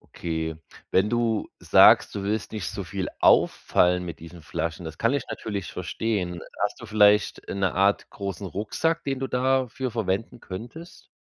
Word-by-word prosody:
Okay, 80 -1 -3 0.4
wenn 95 +3 +3
du 115 -2 0
sagst, - - +6
„du 100 - -3
willst 105 +1 -2
nicht 105 -4 -4
so 100 -1 -5
viel 95 +1 -4
auffallen 90 0 +3
mit 85 -2 -7
diesen 85 +1 -11
Flaschen“. 85 +3 -4
Das 80 - -7
kann 115 +3 +2
ich 140 -3 0
natürlich 100 -5 -5
verstehen. 90 -1 -2 0.2
Hast - - -1
du - - -7
vielleicht, 105 -1 +3
äh, - - -4
'ne 95 -3 0
Art 100 +2 +2
großen 100 0 -5
Rucksack, 160 - -1
den 135 -1 -2
du 135 - -2
dafür 130 0 0
verwenden 110 +1 -2
könntest? 120 - -9
100 Hz, 165 wpm, -25 LUFS, 90-115 Hz, 0.4 s, sagst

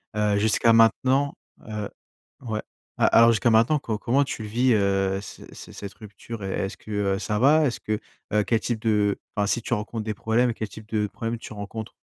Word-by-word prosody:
Heu, 105 -1 +2
jusqu'à 110 +2 +3
maintenant, 130 +5 +3 0.3
heu 105 -2 -4 0.5
ouais. 110 -4 -3 0.4
A - - +5
alors 115 0 +6
jusqu'à 115 +1 +2
maintenant, 115 +7 +4
co 110 -5 -3
comment 130 +5 +2
tu 125 -4 -5
le - - -6
vis, 125 +3 +2
heu, 95 -2 +1
ce 100 - -10
c - - -11
cette 100 -1 -8
rupture? 105 +1 -9
Et 95 - -3
est-ce 95 0 -3
que, 110 - -12 0.2
heu, - - -4
ça 105 +1 -2
va? 150 +5 +5
Est-ce 125 - -1
que, 105 -1 -2 0.3
heu 105 0 +2
quel 110 +3 +1
type 120 -1 -2
de 105 -2 +1 0.2
enfin 105 -1 +1
si 115 +3 0
tu - - -2
rencontres 110 0 -3
des 110 0 -3
problèmes, 115 +3 +1
quel 110 -1 -5
type 110 +2 -12
de 105 -2 0
problèmes 115 +3 -4
tu - - -9
rencontres? 105 +1 -7
110 Hz, 215 wpm, -25 LUFS, 105-115 Hz, 0.5 s, alors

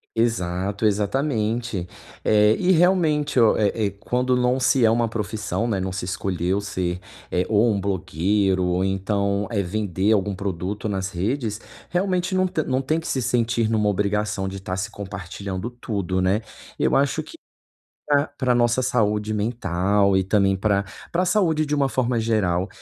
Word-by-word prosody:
Exato, 100 -3 0
exatamente, 110 - -1 0.4
eh, 105 0 +5
e 185 0 +3
realmente 160 -6 +3
o 115 -2 +5
é 105 - +2 0.2
é - - -1
quando 125 +5 -1
não 125 +1 +2
se 130 0 +3
é 110 - +6
uma 115 +1 +2
profissão, 110 +1 -3
né, 105 -5 0
não 95 0 -2
se 95 -1 -4
escolheu 95 0 -1
se, 90 -3 -3 0.3
eh, 90 - +1
ou 110 +2 +3
um 100 - 0
blogueiro, 95 0 0
ou 90 +1 +1
então 100 +1 0
é 100 -3 +1
vender 100 +1 0
algum 100 -1 +1
produto 100 +2 -3
nas 95 -1 -2
redes 110 +4 -2 0.3
realmente 185 0 0
não 185 0 +2
te 160 -3 -1
não 130 0 0
tem 155 +5 0
que 160 - -7
se 130 - -1
sentir 115 -2 +1
numa 105 -2 +2
obrigação 105 0 -1
de 95 +1 -5
estar 95 -1 -4
se 100 +4 -3
compartilhando 100 0 -6
tudo, 100 -6 -3
né. 95 +4 +2 0.4
Eu - - +2
acho 140 +3 +2
que 330 - -12 0.7
pra 145 0 +3
pra 130 -2 -1
a - - +2
nossa 120 +1 +2
saúde 105 -3 +1
mental 100 -2 +1
e 95 - +2
também 95 -1 +2
pra 100 0 +1 0.3
pra 175 +2 +2
a - - +1
saúde 175 -5 +2
de 150 0 -1
uma 140 -1 +2
forma 125 -1 0
geral 100 -5 +1
105 Hz, 175 wpm, -23 LUFS, 95-125 Hz, 0.7 s, é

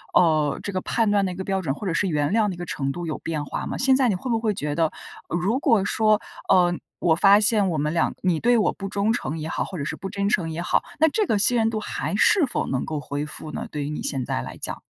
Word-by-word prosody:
呃， 155 -4 +3
这 200 - -3
个 185 - -1
判 225 -3 +1
断 205 -1 +3
的 185 - -2
一 - - -6
个 190 - -4
标 195 0 -1
准， 140 -6 -2
或 210 - -7
者 180 - -1
是 200 - +1
原 150 0 0
谅 220 -1 +3
的 180 - -4
一 - - -14
个 175 - -5
程 135 -3 -2
度， 175 +4 -5
有 155 - -4
变 155 -3 -3
化 - - -4
吗？ - - -4
现 265 0 +4
在 260 -3 +3
你 195 - +1
会 245 +7 -4
不 225 - +2
会 215 -3 0
觉 150 -5 -2
得， 165 +2 +2 0.4
呃， 175 - -1
如 210 +9 0
果 225 -9 +3
说， 215 0 +3 0.3
呃， 180 -2 +5 0.3
我 170 - +3
发 200 +3 +6
现 210 -1 +3
我 160 - -1
们 150 +2 -1
俩 170 - +1
你 175 -4 +2
对 240 +4 +3
我 210 -5 +2
不 195 - -6
忠 200 +2 0
诚 165 -9 -3
也 155 - -4
好， - - -1
或 185 - -7
者 140 - -3
是 155 - -3
不 195 - -6
真 200 0 -1
诚 175 -6 +1
也 160 +2 -4
好， 175 - +1 0.2
那 320 - +7
这 425 +5 0
个 215 - +2
信 230 +5 +3
任 225 -1 +2
度， 220 -1 -2
还 200 - -3
是 320 - +4
否 250 - -2
能 130 - -1
够 155 -2 -3
恢 145 +1 -4
复 155 0 -9
呢？ - - -5
对 150 -1 -4
于 140 - -4
你 150 - -4
现 135 -3 -2
在 - - -2
来 - - -7
讲？ - - -6
185 Hz, 320 characters per minute, -24 LUFS, 155-215 Hz, 0.4 s, 那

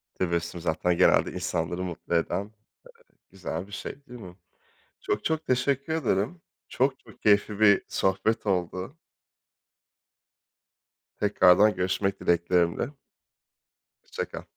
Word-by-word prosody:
Tebessüm 85 -1 -2
zaten 85 +2 0
genelde - - +4
insanları 90 +1 -2
mutlu 85 -1 -4
eden, 85 +3 0 0.7
eee, - - -35
güzel 95 -2 -5
bir 100 - -17
şey 130 - -6
değil 125 -1 -10
mi? 90 -3 -11 0.6
Çok, 105 - -2
çok 160 0 -1
teşekkür 135 +4 0
ederim. 130 - -1 0.3
Çok, 130 +1 0
çok - - -19
keyifli 105 0 +3
bir 100 -2 +6
sohbet 95 +4 0
oldu. 95 - -2 2.2
Tekrardan 105 0 +5
görüşmek 95 +2 -1
dileklerimle. 85 +4 +1 1.1
Hoşça - - -4
kal. - - -9
95 Hz, 110 wpm, -27 LUFS, 90-110 Hz, 2.2 s, bir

